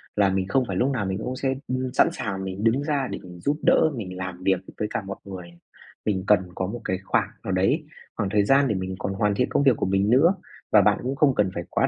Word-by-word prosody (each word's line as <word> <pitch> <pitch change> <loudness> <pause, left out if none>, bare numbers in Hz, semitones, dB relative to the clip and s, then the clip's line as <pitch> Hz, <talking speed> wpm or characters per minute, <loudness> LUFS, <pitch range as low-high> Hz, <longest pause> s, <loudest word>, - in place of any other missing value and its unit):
là 100 -2 +4
mình 95 0 -1
không 130 +6 +2
phải 95 - -3
lúc 130 +7 +2
nào 115 -7 -1
mình 95 0 -2
cũng 125 +4 -4
sẽ, 135 0 0
ưm, 130 0 -2
sẵn - - +5
sàng 95 -3 -4
mình 95 +2 -5
đứng 120 +5 +2
ra 145 -4 0
để - - -4
mình 90 -1 -11
giúp 145 +11 0
đỡ, 155 - +4
mình 90 -5 -6
làm 95 -1 -6
việc 95 -2 +2 0.2
với 105 - 0
cả - - -1
mọi 100 - -6
người, 90 -3 -8 0.5
mình 95 -3 0
cần 105 -2 +6 0.2
có 95 - -2
một 120 +4 -6
cái 95 - 0
khoảng - - +1
nào - - -3
đấy, 115 - +1 0.3
khoảng 100 -3 -1
thời 105 0 +3
gian 135 +3 +4
để 110 - 0
mình 95 0 -3
còn 95 - -2
hoàn 100 +1 +1
thiện 125 - +1
công - - +2
việc 135 -4 +5
của - - -1
mình 95 +2 +1
nữa. 160 +10 +5 0.4
Và - - +7
bạn - - +3
cũng 130 +2 -2
không 140 -2 +3
cần 100 -3 +2
phải 85 - -4
quá - - +1
105 Hz, 275 wpm, -24 LUFS, 95-130 Hz, 0.5 s, Và